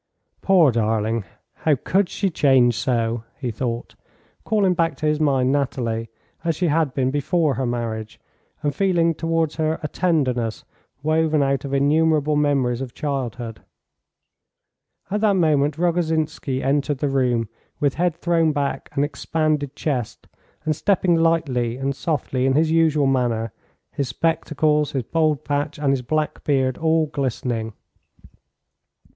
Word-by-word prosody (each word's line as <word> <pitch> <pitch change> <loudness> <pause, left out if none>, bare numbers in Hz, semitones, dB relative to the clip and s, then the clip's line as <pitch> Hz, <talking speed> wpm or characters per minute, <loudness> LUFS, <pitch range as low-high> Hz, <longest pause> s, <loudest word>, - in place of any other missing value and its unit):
"Poor 180 -8 +5
darling; 110 -1 0 0.3
how 155 -2 +2
could 190 +8 0
she 195 -2 -1
change 130 -6 +4
so?" 115 -2 -1
he 125 -4 -3
thought, 120 +1 -4 0.5
calling 205 -4 +2
back 165 -4 0
to 155 - -4
his 150 0 +1
mind 135 -4 +2
Nathalie 120 -5 -1 0.3
as 165 -2 0
she 175 +1 0
had 150 -3 +1
been 130 -1 +1
before 145 +2 +1
her 130 -1 -2
marriage, 115 -2 -4 0.4
and 145 -1 0
feeling 175 -3 +2
towards 165 -1 -1
her 160 0 0
a - - 0
tenderness 130 -11 0 0.4
woven 155 -1 +2
out 135 0 0
of 140 - -5
innumerable 150 +1 +2
memories 135 -4 +1
of 130 -2 -6
childhood. 125 -5 -4 1.5
At 210 +1 0
that 210 -2 +3
moment 150 -4 +2
Rogozhinsky 160 -5 0
entered 140 +1 +1
the 145 - -1
room, 125 -4 +1 0.3
with 145 -2 +1
head 175 0 0
thrown 170 -2 +2
back 140 -1 -2
and 140 - +1
expanded 150 -1 -1
chest, 130 -7 -3 0.4
and 155 -1 +1
stepping 190 +1 +2
lightly 150 -8 +1
and 135 +1 -2
softly 135 -5 -1
in 135 - +3
his 155 +3 +2
usual 160 -3 +3
manner, 120 -4 0 0.4
his 140 - -2
spectacles, 150 +1 0
his 135 -3 -1
bald 155 +1 0
patch, 145 +1 -1
and 145 -2 +1
his 135 -2 0
black 155 +4 -2
beard 130 -3 +1
all 160 0 +2
glistening. 125 -6 -3
145 Hz, 140 wpm, -22 LUFS, 130-160 Hz, 1.5 s, Poor